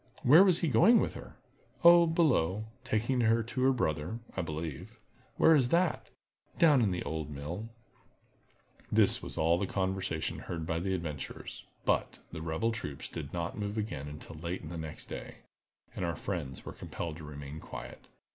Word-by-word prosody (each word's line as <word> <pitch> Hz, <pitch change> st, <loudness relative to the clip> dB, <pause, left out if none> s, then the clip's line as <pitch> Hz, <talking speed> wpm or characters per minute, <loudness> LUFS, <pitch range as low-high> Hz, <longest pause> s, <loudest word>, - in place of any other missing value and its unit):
"Where 155 Hz, +9 st, +8 dB
was 185 Hz, -4 st, +4 dB
he 170 Hz, -, +2 dB
going 155 Hz, -, +6 dB
with -, -, 0 dB
her?" -, -, -10 dB, 0.5 s
"Oh, 170 Hz, 0 st, +8 dB
below—taking 120 Hz, -, +1 dB
her 115 Hz, 0 st, +3 dB
to 120 Hz, +3 st, -4 dB
her 130 Hz, +1 st, +5 dB
brother, 80 Hz, -, -1 dB, 0.2 s
I 95 Hz, -, 0 dB
believe." 80 Hz, -3 st, -5 dB, 0.4 s
"Where 165 Hz, -, +6 dB
is 130 Hz, -5 st, +4 dB
that?" 170 Hz, +1 st, +1 dB, 0.5 s
"Down 150 Hz, -6 st, +6 dB
in 110 Hz, -, +3 dB
the 90 Hz, -1 st, -2 dB
old 80 Hz, -2 st, -4 dB
mill!" 80 Hz, +10 st, -6 dB, 1.2 s
This -, -, +4 dB
was -, -, -7 dB
all 85 Hz, +2 st, +3 dB
the 100 Hz, -, -1 dB
conversation 95 Hz, -4 st, -2 dB
heard 80 Hz, -2 st, -5 dB
by 80 Hz, 0 st, -1 dB
the 95 Hz, +2 st, -1 dB
adventurers. 75 Hz, -6 st, -6 dB, 0.2 s
But, -, -, +1 dB
the 80 Hz, -, -6 dB
rebel 80 Hz, +8 st, 0 dB
troops 75 Hz, -11 st, -5 dB
did -, -, -7 dB
not 85 Hz, +3 st, -3 dB
move 105 Hz, +1 st, -3 dB
again 90 Hz, -10 st, -3 dB
until 75 Hz, +2 st, -9 dB
late 85 Hz, +3 st, -4 dB
in 80 Hz, -, -7 dB
the 85 Hz, -, -5 dB
next 80 Hz, -1 st, -6 dB
day, -, -, -7 dB, 0.6 s
and -, -, -3 dB
our 85 Hz, -1 st, -1 dB
friends 75 Hz, -7 st, -5 dB
were -, -, -6 dB
compelled 85 Hz, -2 st, -6 dB
to 80 Hz, -, -10 dB
remain 75 Hz, 0 st, -8 dB
quiet. -, -, -9 dB
95 Hz, 175 wpm, -31 LUFS, 80-120 Hz, 1.2 s, Where